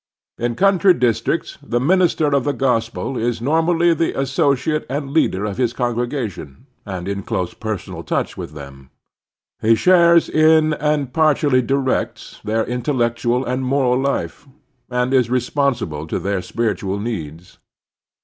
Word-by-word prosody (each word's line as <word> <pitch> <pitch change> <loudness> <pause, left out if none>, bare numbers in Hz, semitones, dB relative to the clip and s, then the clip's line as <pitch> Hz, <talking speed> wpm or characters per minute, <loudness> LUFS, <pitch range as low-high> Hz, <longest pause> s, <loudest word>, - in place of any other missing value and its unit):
In 120 0 -1
the - - -20
cotmtry 195 -2 +4
districts 120 +6 -1
the 120 -4 -1
minister 170 +2 +2
of 140 -3 +2
the 145 - 0
gos 125 -5 +1
pel 125 +2 -5
is 120 0 -1
normally 165 +6 +2
the 165 -2 -1
associate 140 +2 0
and 140 0 -3
leader 105 -10 +1
of 100 -1 -4
his 120 -2 0
con 120 -1 -1
gregation 120 - -4 0.3
and 95 -2 -5
in 100 0 -3
close 90 -1 -3
personal 110 -4 -5
touch - - -2
with 75 - -7
them. 70 -2 -11 0.7
He 115 +1 +4
shares 170 +3 +5
in 155 0 +4
and 150 -3 -1
partially 145 -4 +3
directs 135 +1 -2
their 110 +1 0
intellectual 120 -1 -1
and 125 +1 -2
moral 130 -1 +1
life, 135 - -3 0.4
and 125 +1 0
is 125 -3 +3
responsive 125 - 0
to - - -2
their 100 -1 -2
spiritual 100 -1 -2
needs. 90 -6 -6
125 Hz, 150 wpm, -19 LUFS, 110-145 Hz, 0.7 s, shares